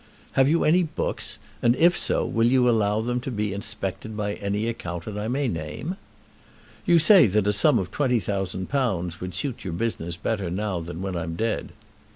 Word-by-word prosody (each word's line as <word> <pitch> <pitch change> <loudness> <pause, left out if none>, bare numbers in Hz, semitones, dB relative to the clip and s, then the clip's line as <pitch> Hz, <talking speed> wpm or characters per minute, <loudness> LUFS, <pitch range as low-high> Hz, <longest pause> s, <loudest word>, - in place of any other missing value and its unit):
Have 135 +1 +3
you 165 +2 +3
any 170 +4 +4
books; 155 -3 -3 0.2
and, 120 +1 +4
if 170 +4 +4
so, - - +1
will 115 0 +2
you 125 0 +4
allow 110 -2 +2
them 120 +2 -1
to 125 - -5
be 105 -4 -2
inspected 105 +1 -4
by 105 -1 -1
any 100 +2 -2
accountant 100 -2 -5
I 105 - -3
may 135 +3 0
name? 80 - -4 0.9
You 175 -1 +6
say 175 - +7
that 105 +1 +1
a 105 - +3
sum 100 - +4
of 90 - -2
£20,000 100 - -1
would 90 -1 -5
suit 120 +6 -3
your 95 - -4
business 85 -4 -3
better 100 -3 -2
now 95 0 -2
than 85 +2 -6
when 95 -2 -3
I'm 80 -1 -3
dead. 115 +5 -2
105 Hz, 185 wpm, -25 LUFS, 95-125 Hz, 0.9 s, say